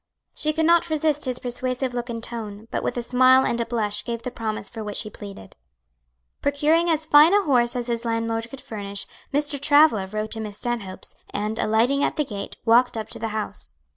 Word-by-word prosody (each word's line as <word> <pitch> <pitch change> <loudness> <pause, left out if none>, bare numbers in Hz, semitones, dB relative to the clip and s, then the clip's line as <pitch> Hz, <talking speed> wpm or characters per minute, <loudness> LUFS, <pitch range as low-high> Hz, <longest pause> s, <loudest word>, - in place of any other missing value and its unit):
She 305 - +1
could 320 +1 0
not 340 +1 +4
resist 305 -1 +1
his 255 -1 -2
persuasive 250 +1 -3
look 245 0 -4
and 230 -1 -5
tone, 220 -2 -5
but - - -1
with - - -3
a 240 - -2
smile 255 +2 +5
and 235 - 0
a 230 - -3
blush 210 -3 0
gave 235 -1 -5
the 250 - -4
promise 215 -4 -4
for 225 -2 -7
which 210 -1 -3
he 215 - -9
pleaded. 200 - -11 0.9
Procuring 300 +4 +2
as 320 -1 +1
fine 310 +5 +7
a 410 - +4
horse 245 -5 +2
as 245 -1 -2
his 235 -1 -2
landlord 230 0 -2
could 270 +2 -10
furnish, 200 -2 -5 0.3
Mr. 290 -1 -1
Travilla 285 -9 +5
rode 215 +2 -4
to 225 - -2
Miss 210 -2 -4
Stanhope's, 230 -6 -5
and 210 +2 -3
alighting 240 +6 +2
at - - 0
the 300 - 0
gate, 205 -5 -6
walked 235 +1 +4
up 220 - -5
to - - -2
the 225 - -2
house. 210 - -4
235 Hz, 210 wpm, -23 LUFS, 215-280 Hz, 0.9 s, fine